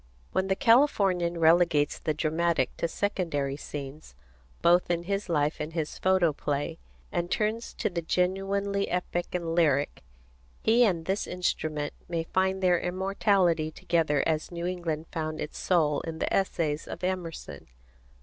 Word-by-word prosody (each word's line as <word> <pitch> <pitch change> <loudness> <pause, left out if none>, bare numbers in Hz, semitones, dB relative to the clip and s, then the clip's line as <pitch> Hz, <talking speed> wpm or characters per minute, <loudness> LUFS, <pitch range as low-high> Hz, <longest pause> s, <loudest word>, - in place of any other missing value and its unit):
When 190 0 0
the 190 - +2
Californian 200 -9 +3
relegates 165 -2 +4
the 155 - -1
dramatic 160 -2 0
to 170 - 0
secondary 165 -8 -1
scenes, 140 - -8 0.5
both 175 +1 +4
in 170 -1 0
his 195 +1 -2
life 150 -2 +1
and 150 +2 -4
his 160 -3 -3
photoplay, 165 -4 +1 0.3
and 175 0 -1
turns 220 +3 -1
to - - -1
the 175 -2 -2
genuinely 195 +3 0
epic 175 0 -2
and 170 -2 -2
lyric, 145 -4 +2 0.6
he 235 +2 +5
and 170 -6 0
this 195 +3 -1
instrument 155 -4 -2 0.2
may 165 -1 -1
find 190 +2 0
their 180 -2 +4
immortality 185 -3 +1
together 160 -3 +1
as 160 +1 -1
New 170 0 -4
England 170 -3 -2
found 155 -1 -3
its 150 - -5
soul 155 -5 +2
in 165 -1 -6
the - - -2
essays 160 -5 0
of - - -7
Emerson. 180 -3 -4
170 Hz, 145 wpm, -28 LUFS, 155-190 Hz, 0.6 s, he